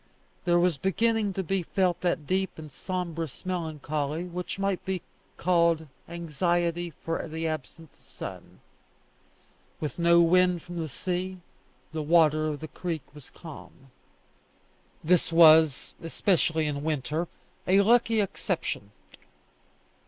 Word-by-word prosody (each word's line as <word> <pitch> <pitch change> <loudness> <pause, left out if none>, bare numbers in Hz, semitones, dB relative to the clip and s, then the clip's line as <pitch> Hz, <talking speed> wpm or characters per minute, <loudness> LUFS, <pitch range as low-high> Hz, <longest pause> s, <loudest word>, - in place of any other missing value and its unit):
There 175 -1 +4
was 175 -3 +2
beginning 215 +4 +1
to 190 - -1
be 190 +2 0
felt 180 0 0
that 175 -4 0
deep 190 +4 -1
and 155 -2 -9
sombrous 165 -2 -4
melancholy 155 -3 -2
which 180 +1 -5
might 195 -1 -1
be 185 -2 -3 0.3
called 170 -2 +2 0.2
anxiety 170 +1 -1
for 165 +2 -4
the 160 +1 -3
absent 155 +1 -6
sun. - - -10 1.2
With 150 0 -4
no 170 0 +5
wind 180 0 +4
from 175 0 -8
the 160 -1 -3
sea, 185 +6 -3 0.5
the 160 -1 -3
water 155 -1 +4
of 150 -1 -3
the 155 - -5
creek 165 -2 -4
was 145 -3 -12
calm. 140 -4 -12 1.1
This 170 +1 +2
was, 160 -3 +6
especially 165 -1 +1
in 145 -1 -2
winter, 155 +2 -1 0.4
a 195 +2 +6
lucky 225 +1 +4
exception. 140 - -3
170 Hz, 125 wpm, -27 LUFS, 155-180 Hz, 1.2 s, was